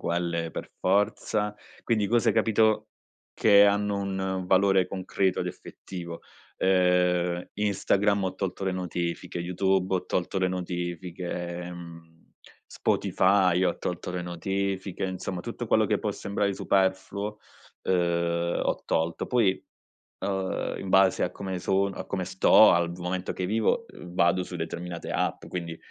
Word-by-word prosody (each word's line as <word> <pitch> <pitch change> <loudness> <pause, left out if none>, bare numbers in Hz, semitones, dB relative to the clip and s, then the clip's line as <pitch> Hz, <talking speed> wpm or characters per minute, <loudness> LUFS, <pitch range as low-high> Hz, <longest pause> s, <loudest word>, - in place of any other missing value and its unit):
quelle 85 -1 -1
per - - -7
forza, 105 +2 +1 0.3
quindi 110 -3 +1
cose, 115 +3 +3
capito, 110 -1 +2 0.5
che 100 -2 +6
hanno 100 0 +2
un 100 -1 -3
un 95 -1 -2
valore 95 0 +4
concreto 95 0 -1
ed - - -2
effettivo. 85 -2 -8 0.4
Ehm, 90 -1 +2
Instagram 100 -1 +1
ho 95 - -2
tolto 95 0 -3
le 95 - 0
notifiche, 90 -2 -3
YouTube 95 +2 +1
ho 90 - -1
tolto 90 +2 -1
le 95 -1 +2
notifiche, 90 -1 -4 0.4
ehm, 85 -2 -10 0.5
Spotify 95 -2 +2
ho 90 - 0
tolto 90 0 -4
le 90 0 -3
notifiche, 95 +2 -3
insomma, 95 -1 -4
tutto - - -5
quello - - +3
che - - +1
può - - -2
sembrare 100 0 -1
superfluo, 100 +1 0 0.4
ehm, 85 -1 +1
ho - - -1
tolto. 80 +1 -1
Poi, 110 -7 +1 0.6
uhm, 95 -1 -2
in 95 - -6
base 95 0 +4
a - - +1
come 95 -2 -5
son 95 +2 +1
a - - -6
come 95 -2 -3
sto, 95 +1 +6
al 85 0 +2
v 85 - -9
momento 90 +1 -3
che 95 - -3
vivo, 110 +3 +1
ehm, 90 -1 -11
vado 85 +1 +3
su - - -8
determinate 85 0 -5
app, - - -1
quindi, 85 -2 -5
95 Hz, 145 wpm, -27 LUFS, 90-100 Hz, 0.6 s, che